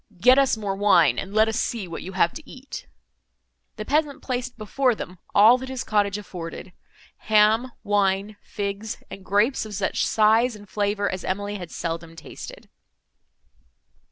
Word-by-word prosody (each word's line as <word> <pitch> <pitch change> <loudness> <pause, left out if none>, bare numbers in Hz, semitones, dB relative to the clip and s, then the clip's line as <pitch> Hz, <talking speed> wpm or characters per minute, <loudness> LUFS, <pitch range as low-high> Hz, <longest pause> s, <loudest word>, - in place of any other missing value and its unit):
Get 255 +7 +6
us 270 -4 +3
more 200 -3 -3
wine, 175 - +4
and 195 - -6
let 215 +1 +4
us 220 +2 -1
see 220 -6 -2
what 165 - -6
you 190 - -8
have 170 -2 +2
to 315 - -11
eat." 265 +1 -9 0.9
The 215 - -6
peasant 295 +1 0
placed 250 -1 -3
before 245 +3 +1
them 180 -3 -8 0.2
all 225 +5 +7
that 260 +1 -7
his 260 -2 -4
cottage 205 -2 +1
afforded—ham, 210 +5 -1
wine, 200 0 +1
figs, 205 +1 -4
and 195 - -9
grapes 205 +8 +2
of 215 -2 -7
such 195 0 0
size 225 +2 +3
and 205 -1 -13
flavour, 205 0 -1
as 185 -1 -4
Emily 205 +2 -3
had 175 -2 -7
seldom 165 -1 -5
tasted. 165 - -10
210 Hz, 155 wpm, -24 LUFS, 195-230 Hz, 0.9 s, all